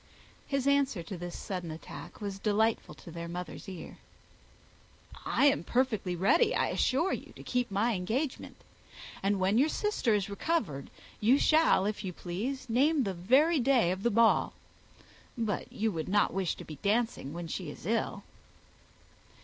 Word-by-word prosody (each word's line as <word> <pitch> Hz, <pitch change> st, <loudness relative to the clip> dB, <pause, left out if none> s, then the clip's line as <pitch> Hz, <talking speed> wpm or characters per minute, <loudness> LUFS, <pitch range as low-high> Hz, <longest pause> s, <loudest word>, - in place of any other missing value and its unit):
His 275 Hz, -2 st, -1 dB
answer 280 Hz, -9 st, +2 dB
to 190 Hz, -, -7 dB
this 175 Hz, 0 st, -6 dB
sudden 180 Hz, -4 st, -5 dB
attack 165 Hz, +3 st, -9 dB
was 200 Hz, -1 st, -4 dB
delightful 215 Hz, -5 st, +1 dB
to 135 Hz, +4 st, -12 dB
her 170 Hz, +1 st, -6 dB
mother's 175 Hz, +1 st, -6 dB
ear. 185 Hz, -3 st, -9 dB, 1.3 s
"I -, -, +3 dB
am 285 Hz, 0 st, +4 dB
perfectly 220 Hz, -8 st, 0 dB
ready, 315 Hz, -, +3 dB
I -, -, +1 dB
assure 310 Hz, +9 st, +1 dB
you, -, -, -6 dB
to -, -, -12 dB
keep 250 Hz, -1 st, -1 dB
my 210 Hz, +4 st, +1 dB
engagement; 225 Hz, +10 st, -2 dB, 0.7 s
and, 195 Hz, 0 st, +1 dB
when 195 Hz, +5 st, +3 dB
your 295 Hz, +4 st, +4 dB
sister 310 Hz, -, +1 dB
is 200 Hz, -1 st, 0 dB
recovered, 200 Hz, -, -2 dB, 0.3 s
you 240 Hz, +6 st, +5 dB
shall, 310 Hz, -11 st, +4 dB
if 210 Hz, 0 st, -2 dB
you 185 Hz, -2 st, -4 dB
please, 225 Hz, +12 st, -4 dB
name 275 Hz, +5 st, +3 dB
the 195 Hz, -4 st, -2 dB
very 270 Hz, -, +3 dB
day 245 Hz, -8 st, +3 dB
of 185 Hz, +1 st, -3 dB
the 235 Hz, -, +2 dB
ball. 230 Hz, +1 st, +3 dB, 0.8 s
But 220 Hz, -5 st, -2 dB
you 220 Hz, +1 st, -1 dB
would 160 Hz, -2 st, -4 dB
not 205 Hz, +1 st, +3 dB
wish 190 Hz, -3 st, -1 dB
to -, -, -10 dB
be 155 Hz, -, -9 dB
dancing 215 Hz, -, 0 dB
while 170 Hz, +2 st, -5 dB
she 165 Hz, 0 st, -5 dB
is 145 Hz, -, -10 dB
ill?" 225 Hz, +4 st, -1 dB
210 Hz, 165 wpm, -30 LUFS, 180-255 Hz, 1.3 s, you